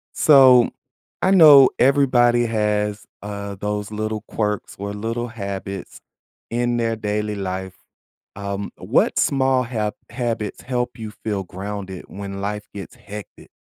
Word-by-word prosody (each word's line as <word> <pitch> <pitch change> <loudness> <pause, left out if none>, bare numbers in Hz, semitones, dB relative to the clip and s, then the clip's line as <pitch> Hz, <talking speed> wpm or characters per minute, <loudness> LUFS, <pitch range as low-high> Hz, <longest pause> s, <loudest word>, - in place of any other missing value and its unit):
So, 130 -5 +7 0.5
I 190 - +3
know 150 -8 +9
everybody 120 -3 +4
has, 105 -2 -1 0.2
uh, 100 -1 -6
those 105 +1 -4
little 110 0 -3
quirks 105 -2 -2
or 100 +1 -5
little 115 +3 -3
habits 100 -3 -6 0.5
in 120 0 0
their 115 -1 0
daily 105 0 -2
life. 95 -1 -4 0.6
Um, 100 0 -4
what - - +1
small 130 -2 +2
hab 110 -3 -2 0.2
habits 115 -4 -3
help 125 -1 -3
you 110 -1 -6
feel 105 -2 -4
grounded 95 0 -7
when 100 0 -7
life 105 +1 -3
gets 100 -2 -9
hectic? 105 0 -11
105 Hz, 130 wpm, -21 LUFS, 100-120 Hz, 0.6 s, know